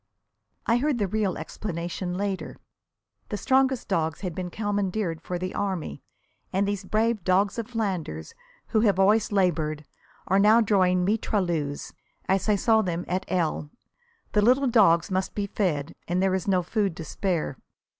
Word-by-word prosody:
I 230 - +3
heard 280 +1 +1
the 205 -4 0
real 205 -1 -1
explanation 175 -1 -4
later. 195 -1 -3 0.7
The 210 - -2
strongest 265 +3 +2
dogs 160 -5 -1
had 180 -4 -3
been 180 +1 -4
commandeered 200 -4 -2
for 180 +1 -4
the 185 +1 -4
army, 180 - -3 0.5
and 195 +2 +1
these 200 -1 -2
brave 215 0 0
dogs 190 +5 +2
of 225 - -4
Flanders, 185 - -3 0.4
who 220 - +2
have 210 -4 +3
always 210 +3 +3
laboured, 155 -6 0 0.4
are 190 +2 +3
now 215 +3 +6
drawing 185 -5 +3
mitrailleuses, 175 -8 -1 0.3
as 190 +2 +1
I 210 - +5
saw 220 +2 +3
them 175 -3 -2
at 185 +1 -2
L. 160 -4 -1 0.6
The 210 - +3
little 255 +6 +4
dogs 195 -9 +4
must 185 0 -1
be 205 - -1
fed, 170 -8 -1
and 175 +1 0
there 190 0 +2
is 190 0 -2
no 185 -2 +2
food 200 -2 -1
to 165 - -6
spare. 170 -9 -2
190 Hz, 160 wpm, -26 LUFS, 175-210 Hz, 0.7 s, now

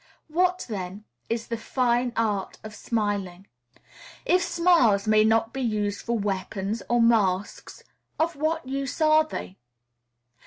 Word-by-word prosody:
What, 360 +3 +1
then, 195 -2 -6 0.3
is 230 0 -2
the 230 - -4
fine 245 +1 0
art 210 -4 -1
of 215 0 -8
smiling? 205 -5 -3 0.8
If 365 +1 +3
smiles 330 - +3
may 215 0 +5
not 225 +1 +2
be 270 - -4
used 210 -4 -1
for 235 0 -1
weapons 200 +1 -3
or 240 0 +3
masks, 205 -5 +1 0.3
of 330 +1 0
what 310 0 -2
use 275 +1 -4
are 310 0 +5
they? 195 -10 -7
230 Hz, 130 wpm, -25 LUFS, 205-275 Hz, 0.8 s, may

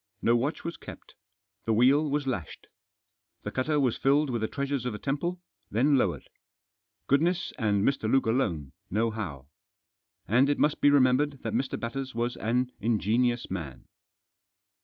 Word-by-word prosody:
No 120 - +4
watch 135 +6 -1
was 170 - -5
kept. - - -12 0.5
The 115 - +1
wheel 135 +7 +4
was 145 0 -1
lashed. 110 - -4 0.8
The 105 - -4
cutter 150 +5 0
was 130 -5 +1
filled 140 +1 +2
with 120 -2 -2
the 110 - 0
treasures 140 -1 -2
of 125 -2 -3
the - - -4
temple, 160 +9 -2 0.3
then 135 +7 +3
lowered. 130 - 0 0.8
Goodness 170 +6 +1
and 105 -3 +1
Mr. 115 -5 0
Luke 135 - +3
alone 95 - 0 0.2
know 110 +4 +1
how. 80 -12 -6 0.8
And 125 +6 +4
it 145 - +1
must 150 - +1
be 145 - +6
remembered 140 0 +3
that - - -3
Mr. 130 - -1
Batters 130 +2 -5
was 120 +1 -1
an 125 +3 0
ingenious 120 +2 0
man. 80 -8 -6
125 Hz, 160 wpm, -28 LUFS, 110-140 Hz, 0.8 s, be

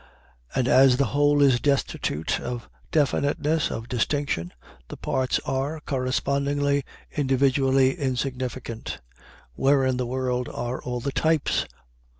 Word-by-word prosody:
And 125 - +1
as 130 -1 +6
the 140 - +3
whole 145 0 +4
is 130 -4 +4
destitute 135 - 0
of 120 -1 -5 0.2
definiteness, 145 +1 +1
of 115 +1 -5
distinction, 125 - -1 0.4
the - - -8
parts 130 -1 0
are, 140 +4 -2
correspondingly, 140 +2 0 0.3
individually 135 -1 +3
insignificant. 130 -3 -3 0.5
Where 135 - +3
in 130 -1 +1
the 125 -1 -2
world 125 -1 -1
are 120 +1 -4
all 125 -1 -4
the 140 - -2
types? 160 +1 +1
135 Hz, 120 wpm, -25 LUFS, 125-140 Hz, 0.5 s, as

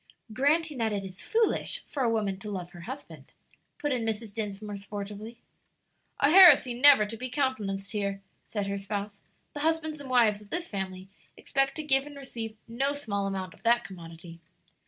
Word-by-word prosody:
"Granting 295 +3 +1
that 225 -1 +1
it 200 -1 -2
is 190 0 -9
foolish 455 -1 0
for 280 - -4
a 240 - +3
woman 205 -4 -1
to 210 +1 -7
love 180 -3 -5
her 175 - -11
husband," 270 +2 -9 0.4
put 295 - -2
in 250 -3 0
Mrs. 220 -1 -3
Dinsmore, 210 -1 -5
sportively. 205 +3 -7 0.8
"A 280 - +4
heresy 330 -9 +8
never 260 -2 +7
to 215 +2 -6
be 255 +3 -5
countenanced 210 -8 -1
here," 200 -2 -2 0.3
said 205 -2 -2
her 200 0 -3
spouse; 200 0 -5 0.3
"the 290 - -6
husbands 315 0 0
and 280 -2 -9
wives 225 -5 +4
of 205 - -16
this 345 0 -2
family 190 -2 -5 0.3
expect 270 0 0
to 310 - -4
give 270 -1 +2
and 290 -1 -10
receive 225 -5 -7
no 270 +5 0
small 200 -9 -2
amount 190 -1 -4
of - - -21
that 235 +1 +3
commodity. 170 -2 -11
220 Hz, 180 wpm, -28 LUFS, 200-275 Hz, 0.8 s, heresy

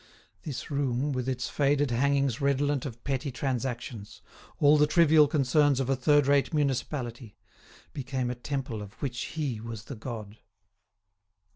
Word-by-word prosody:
This 140 0 -6
room, 140 0 0
with 130 0 -2
its 125 -1 -2
faded 145 -1 +1
hangings 140 +1 +1
redolent 140 0 +1
of 115 -2 -10
petty 140 +1 -2
transactions, 120 -4 -4 0.4
all 145 0 +6
the 150 0 +4
trivial 155 -2 +5
concerns 145 -1 +3
of 135 0 0
a - - +3
third 145 +2 +3
rate 140 0 +3
municipality, 130 -5 -2 0.6
became 130 -2 -2
a - - -1
temple 125 -3 -4
of 100 0 -9
which 125 +4 -5
he 135 -8 -2
was 115 -2 -7
the 135 - -8
god. 110 -2 -7
135 Hz, 145 wpm, -28 LUFS, 120-145 Hz, 0.6 s, all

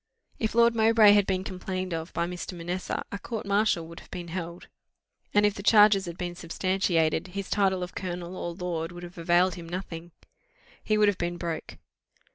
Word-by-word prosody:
If 220 0 -1
Lord 235 0 +5
Mowbray 220 -1 +6
had 205 -1 +4
been 185 -1 0
complained 185 -1 -4
of 165 +1 -4
by 170 - -1
Mr. 180 +1 -6
Manessa, 175 +2 -3
a 200 - -4
court 225 0 -5
martial 200 -4 +2
would 165 +1 -10
have - - -17
been 175 -2 -7
held; 170 0 -6 0.6
and 205 0 +4
if 205 - +3
the 200 - -7
charges 205 -2 +6
had 170 0 -6
been 175 -1 -4
substantiated, 170 -2 0
his 195 +1 -6
title 190 -3 +2
of 180 - -7
colonel 180 -1 -5
or 175 -1 -4
lord 170 -2 -3
would 175 0 -9
have 175 0 -10
availed 175 +2 +3
him 170 -1 -9
nothing 175 -2 -6 0.7
he 215 - +1
would 210 0 +5
have 205 -2 +1
been 175 0 -2
broke. 170 -2 -5
180 Hz, 195 wpm, -27 LUFS, 170-200 Hz, 0.7 s, Mowbray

